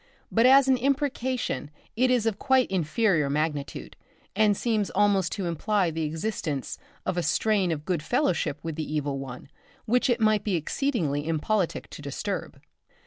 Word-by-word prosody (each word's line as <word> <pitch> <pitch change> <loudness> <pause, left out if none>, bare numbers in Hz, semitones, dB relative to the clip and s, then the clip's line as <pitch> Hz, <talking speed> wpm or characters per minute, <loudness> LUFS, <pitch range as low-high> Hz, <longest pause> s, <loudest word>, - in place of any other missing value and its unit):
But 230 +2 +4
as 270 +1 +7
an 260 -1 +4
imprecation 260 - -1 0.3
it 255 +3 +3
is 245 -3 +2
of 220 -3 -1
quite 260 -5 +2
inferior 175 -3 +1
magnitude, 150 0 -3 0.4
and 210 -1 +3
seems 220 -4 0
almost 200 -3 +2
to 195 - -3
imply 180 +2 0
the 160 +1 -3
existence 155 -3 -3 0.3
of 185 - -1
a - - +2
strain 190 +3 +1
of 150 -2 -4
good 180 -5 -1
fellowship 180 - 0
with 165 -2 -4
the 155 -1 -4
Evil 145 -2 -1
One 130 -1 -8 0.4
which 250 +3 +2
it 240 - +2
might 215 -2 +3
be 205 -4 0
exceedingly 160 - -1
impolitic 170 +4 -1
to - - -9
disturb. - - -4
195 Hz, 160 wpm, -26 LUFS, 155-230 Hz, 0.4 s, as